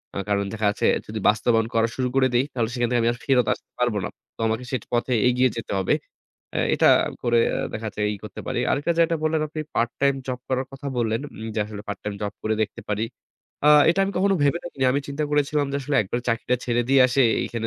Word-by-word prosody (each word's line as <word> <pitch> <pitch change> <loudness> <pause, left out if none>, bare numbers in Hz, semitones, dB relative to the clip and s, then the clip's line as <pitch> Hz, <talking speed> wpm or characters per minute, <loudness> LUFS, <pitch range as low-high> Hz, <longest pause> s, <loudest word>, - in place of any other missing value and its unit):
আ - - -3
কারণ 100 0 +2
দেখা 110 -1 -2
যাচ্ছে 100 - 0 0.2
যদি 110 +1 -4
বাস্তবায়ন 115 +1 +2
করা 115 0 +3
শুরু 130 -1 0
করে 135 -1 +4
দেই 120 +2 +3
তাহলে 115 -3 0
সেখান 120 -1 0
থেকে 120 -1 +2
আমি 115 - +3
আর - - -9
ফেরত 125 -4 +3
আসতে - - -15
পারব 125 -2 +2
না। - - -3 0.3
তো - - -56
আমাকে 110 +3 -1
সেই 130 -5 -2
পথে 120 +2 +1
এগিয়ে 125 +1 +3
যেতে 115 - -5
হবে। 95 - +1 0.6
এ্যা - - +1
এটা - - +4 0.3
করে 120 -1 +3 0.3
দেখা 110 +1 -4
যাচ্ছে 105 - -8
ই - - -7
করতে - - -8
পারি। - - -1
আরেকটা 145 +5 +1
যেটা 165 0 +3
বললেন 155 0 +1
আপনি 155 +1 -5
part 120 0 +1
time 140 -1 +3
job 130 -1 -3
করার 130 0 -1
কথা 135 +1 -8
বললেন 115 -1 0
উম 110 - -7
যে - - -2
আসলে 105 -1 -8
part 100 - -3
time 105 -1 -3
job 105 -1 -2
করে 110 0 0
দেখতে 110 +2 -4
পারি। 105 +1 0 0.6
আ - - +7 0.2
এটা 180 +3 +1
আমি 195 - -3
কখনো 195 +1 +3
ভেবে 145 +4 +2
দেখিনি। 140 -6 -3
আমি 140 - +1
চিন্তা 145 +2 -2
করেছিলাম 145 0 +1
যে - - 0
আসলে 140 +2 0
একবারে 120 +5 -3
চাকরিটা 120 +2 +1
ছেড়ে 120 0 +1
দিয়ে 135 0 +5
এসে 135 +2 +3 0.2
এইখানে 115 -1 -3
125 Hz, 240 wpm, -24 LUFS, 110-140 Hz, 0.6 s, আ